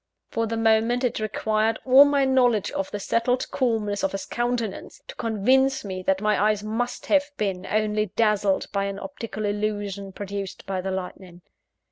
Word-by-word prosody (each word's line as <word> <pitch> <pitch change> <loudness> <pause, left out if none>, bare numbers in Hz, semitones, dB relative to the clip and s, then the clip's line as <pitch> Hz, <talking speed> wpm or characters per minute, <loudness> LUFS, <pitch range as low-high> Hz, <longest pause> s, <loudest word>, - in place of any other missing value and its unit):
For 230 0 -1
the 225 +1 -3
moment, 225 +2 +2
it 245 - 0
required 215 +1 0
all 265 +2 +8
my 285 -1 +2
knowledge 245 -6 +2
of 195 - -3
the 205 - -5
settled 235 +5 0
calmness 220 -6 0
of 195 - 0
his 195 - -4
countenance, 240 -4 -3
to - - -9
convince 255 +4 +1
me 185 -2 -4
that 190 +1 0
my 210 -2 +2
eyes 210 -1 +2
must 230 +3 -3
have 290 -1 +2
been 190 -3 -2
only 215 0 0
dazzled 210 -3 +2
by 200 -1 0
an 200 0 -4
optical 230 -4 -6
illusion 205 -1 -3
produced 200 0 -6
by 190 -1 -2
the 190 - -4
lightning. 180 -1 -6
215 Hz, 170 wpm, -24 LUFS, 200-235 Hz, -, all